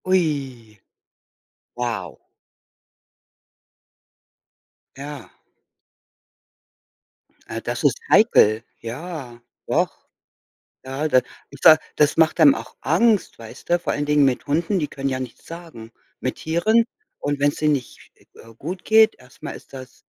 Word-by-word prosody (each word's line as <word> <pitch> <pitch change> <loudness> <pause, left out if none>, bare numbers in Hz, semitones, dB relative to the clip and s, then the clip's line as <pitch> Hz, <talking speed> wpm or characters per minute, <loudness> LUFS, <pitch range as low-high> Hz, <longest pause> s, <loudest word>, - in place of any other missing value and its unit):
Ui. 135 - -1 1.0
Wow. 115 - -4 2.8
Ja. 145 +2 -9 2.2
Ah, - - -5
das - - -4
ist - - +3
heikel. 115 - +5 0.2
Ja, 125 -1 -7 0.3
doch. - - +1 1.0
Ja, 135 +4 -2
da 130 - +5 0.4
da 155 - +9 0.2
das 150 -1 +3
macht 160 +1 +3
einem 145 -4 +7
auch 115 +1 -9
Angst, 205 +7 +2
weißt 115 -1 -12
du, 175 0 +3
vor - - -2
allen 145 - -2
Dingen 150 0 +3
mit 130 +1 -1
Hunden, 165 +6 0
die 150 - -1
können 135 -1 -4
ja 130 -1 -2
nichts 130 -2 -8
sagen, 165 -10 -10 0.3
mit 130 - -2
Tieren 215 +9 +2 0.3
und 145 0 -2
wenn's 145 0 +2
denen 150 -1 +2
nicht, 130 -4 -6 0.2
äh, 115 - -15
gut 180 +8 -6
geht, 220 0 +5
erst 125 -1 -21
mal - - -4
ist - - -13
das 130 -2 -11
145 Hz, 125 wpm, -22 LUFS, 125-165 Hz, 2.8 s, da